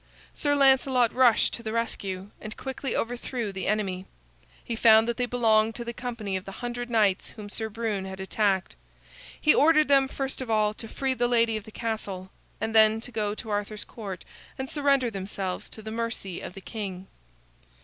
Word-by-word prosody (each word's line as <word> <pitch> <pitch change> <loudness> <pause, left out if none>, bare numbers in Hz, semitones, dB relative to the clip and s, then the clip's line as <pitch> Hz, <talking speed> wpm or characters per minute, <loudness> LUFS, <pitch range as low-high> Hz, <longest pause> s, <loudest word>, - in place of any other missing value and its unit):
Sir 290 -1 +1
Lancelot 265 -3 +4
rushed 250 -3 +4
to - - -5
the 220 -2 -4
rescue 200 -4 -3
and 215 +1 -7
quickly 265 -1 -4
overthrew 240 -1 -2
the 190 -1 -4
enemy. 195 -3 -1 0.6
He 235 - -3
found 225 0 +6
that 235 - -1
they 245 - 0
belonged 225 -2 +3
to 235 - -5
the 235 - -4
company 230 -5 -4
of 190 - -2
the 195 - -8
hundred 245 +2 -5
knights 210 -5 +2
whom 210 -2 -9
Sir 220 +1 -3
Brune 215 -3 -2
had 190 0 -7
attacked. 190 0 0 0.6
He 305 - +5
ordered 305 -1 +5
them, 275 -1 +5
first 270 0 -4
of 255 - -5
all, 215 -1 +2
to 225 - -8
free 265 +4 -1
the 245 -1 +1
lady 230 -2 +3
of 215 -1 -4
the 220 - -11
castle, 205 -5 -4 0.3
and 220 - -2
then 220 0 +6
to 245 - -9
go 210 -2 -1
to 220 0 -7
Arthur's 205 +1 -2
Court 195 -6 -7 0.3
and 265 0 -3
surrender 275 -4 +2
themselves 190 -2 -4
to 220 - -11
the 220 - -6
mercy 225 -5 -3
of 180 - -8
the 195 - -8
king. 195 -4 -5
225 Hz, 190 wpm, -27 LUFS, 205-245 Hz, 0.6 s, found